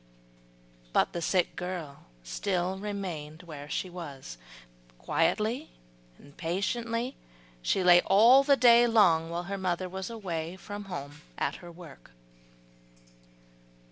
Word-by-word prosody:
But - - +2
the 170 - -3
sick 180 +2 +1
girl 175 -6 -6 0.2
still 185 - -2
remained 180 -6 -5
where 150 -4 -9
she 185 - -2
was, 140 - -9 0.6
quietly 215 - 0 0.5
and 145 - -18
patiently 230 +8 -2 0.5
she 185 - +1
lay 175 -1 +7
all 235 +8 +7
the 280 0 +4
day 240 -1 +6
long, 175 -8 +4
while 170 +1 -3
her 195 +2 -5
mother 185 0 -1
was 190 +2 -6
away 175 -7 -4
from 205 +2 -8
home 145 -5 -7 0.2
at - - -1
her 175 -1 -11
work. 165 -6 -14
180 Hz, 120 wpm, -29 LUFS, 165-205 Hz, 0.6 s, lay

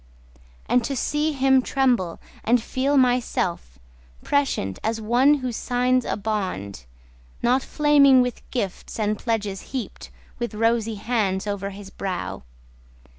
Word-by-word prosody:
And 245 - +3
to 275 - -2
see 295 +4 0
him 265 -1 +4
tremble, 250 -11 0 0.2
and 245 +2 +3
feel 265 +5 0
myself 245 - 0 0.5
Prescient, 270 - 0
as 225 0 -1
one 245 +7 +4
who 250 - -1
signs 250 +2 +1
a - - -2
bond— 185 - -3 0.6
Not 250 +3 +3
flaming 280 -3 +5
with 250 -1 -4
gifts 205 -3 -4
and 210 -1 0
pledges 210 -5 -2 0.2
heaped 245 - -7 0.3
With 235 -2 -3
rosy 225 0 +1
hands 205 -3 -1
over 200 -1 -3
his 195 0 -10
brow. 190 -2 -4
235 Hz, 125 wpm, -23 LUFS, 200-255 Hz, 0.6 s, flaming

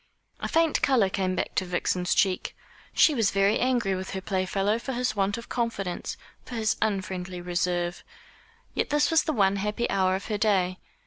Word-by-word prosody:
A - - -3
faint 330 -1 +2
colour 240 -8 +3
came 185 -1 0
back - - -2
to - - +1
Vixen's 180 0 0
cheek. 190 -3 +1 0.4
She 310 - +5
was 225 -7 +2
very 195 +1 +2
angry 245 -6 +1
with 190 0 -4
her - - -1
playfellow 195 +3 0
for 265 +3 -4
his 250 -1 -1
want 200 +2 0
of 235 - -8
confidence, 230 -7 -3 0.3
for 245 - -8
his 220 -1 +1
unfriendly 185 -3 -2
reserve. 175 0 -1 0.7
Yet - - -1
this 295 +1 +2
was 325 - +4
the 310 - 0
one 200 -4 +3
happy 210 +4 -1
hour 185 -1 +2
of 190 - -5
her 210 -2 -2
day. 185 -4 +2
195 Hz, 185 wpm, -27 LUFS, 185-235 Hz, 0.7 s, She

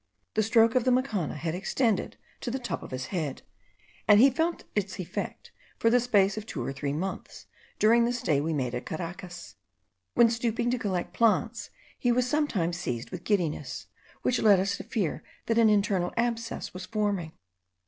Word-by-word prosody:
The 215 - +2
stroke 225 +1 +4
of 255 - +3
the 255 - +2
macana 245 - 0
had 160 +2 -3
extended 200 +3 0 0.2
to - - -4
the 255 - -1
top 245 -3 -4
of - - -9
his 130 0 -4
head, 155 -7 -3 0.6
and 205 -1 +7
he 270 +4 +7
felt 325 +6 -1
its 195 -1 -2
effect 185 0 -5 0.3
for 230 - +3
the 245 - +5
space 205 -4 +3
of 215 0 -5
two - - -4
or 135 - -3
three 140 +1 -3
months 180 +7 -5 0.3
during 235 +2 +5
the 240 - +1
stay 160 - +1
we 160 +2 -1
made 130 -5 -1
at 125 - -4
Caracas. 170 - -7 0.6
When 235 -1 +6
stooping 235 +1 0
to 250 - 0
collect 185 -5 -2
plants, 230 +1 +1 0.3
he 245 - +2
was 250 +1 +2
sometimes 210 - 0
seized 120 -9 -4
with 180 -2 -6
giddiness, 155 -9 -1 0.4
which 250 - +1
led 205 -4 +6
us 195 +2 0
to - - -7
fear 195 -9 -2 0.2
that 230 0 +2
an 225 -1 +6
internal 200 -4 +2
abscess 235 -1 -2
was 185 0 -7
forming. 200 -6 -1
205 Hz, 185 wpm, -28 LUFS, 175-235 Hz, 0.6 s, and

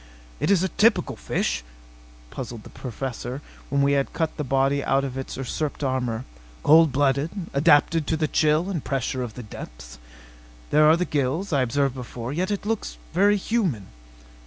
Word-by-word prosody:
"It - - 0
is 195 -3 +4
a - - +2
typical 220 +6 +2
fish," - - -2 0.7
puzzled 120 -3 -6
the - - -13
Professor 125 0 -5 0.3
when 140 0 +2
we 140 - +3
had 140 -1 +1
cut 160 -1 -1
the 150 - -3
body 135 +1 +1
out 135 0 +2
of 135 -2 -4
its 135 0 -5
usurped 145 +3 -3
armor. 125 -3 -1 0.4
"Cold 160 0 +6
blooded, 140 +2 +2 0.2
adapted 145 +2 +4
to 160 - +1
the 155 0 +1
chill 155 +3 +2
and 180 -7 -3
pressure 135 -1 -2
of 120 -3 -5
the 125 - -7
deeps. - - -10 0.7
There 150 +1 +6
are 160 - +6
the 180 - 0
gills 150 +6 -1
I 140 - +3
observed 135 +2 +1
before... 125 0 -6
yet 180 +4 -1
it 205 -1 -2
looks 225 0 -2 0.2
very 200 +4 +4
human." 185 - -1
140 Hz, 175 wpm, -24 LUFS, 130-160 Hz, 0.7 s, Cold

